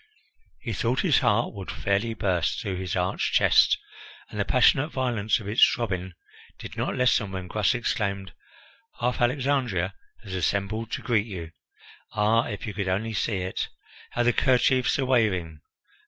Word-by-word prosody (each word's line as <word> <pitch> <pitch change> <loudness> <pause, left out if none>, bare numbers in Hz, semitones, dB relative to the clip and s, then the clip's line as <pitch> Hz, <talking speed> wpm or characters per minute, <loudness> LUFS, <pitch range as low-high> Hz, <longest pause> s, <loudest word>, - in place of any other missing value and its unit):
He 115 -4 -4
thought 120 +6 0
his 170 -7 +3
heart 105 +3 +1
would 95 -4 -8
fairly 100 +6 -1
burst 90 -6 0
through 100 -6 -3
his 90 -3 -3
arched - - -1
chest, - - +5 0.5
and - - -6
the - - +1
passionate 140 +3 +4
violence 120 -7 0
of 105 - -9
its 105 +3 +4
throbbing 95 -6 +1 0.4
did - - -9
not - - -2
lessen 125 -5 +2
when 95 -1 -5
Gras 105 +5 +1
exclaimed: 100 -5 -2 0.7
"Half 125 +1 -1
Alexandria 125 -8 0 0.3
has 100 -3 -8
assembled 100 +5 -1
to - - -3
greet 110 -2 +1
you. 85 -6 -7 0.6
Ah, 110 +2 +2
if 105 -3 -5
you 110 - -5
could 100 0 -3
only 105 +5 -1
see 100 -1 -1
it! 90 +1 -3 0.4
How 120 - +1
the 120 0 +3
kerchiefs 130 0 +3
are 135 - 0
waving! 95 - +1
105 Hz, 160 wpm, -26 LUFS, 95-120 Hz, 0.7 s, chest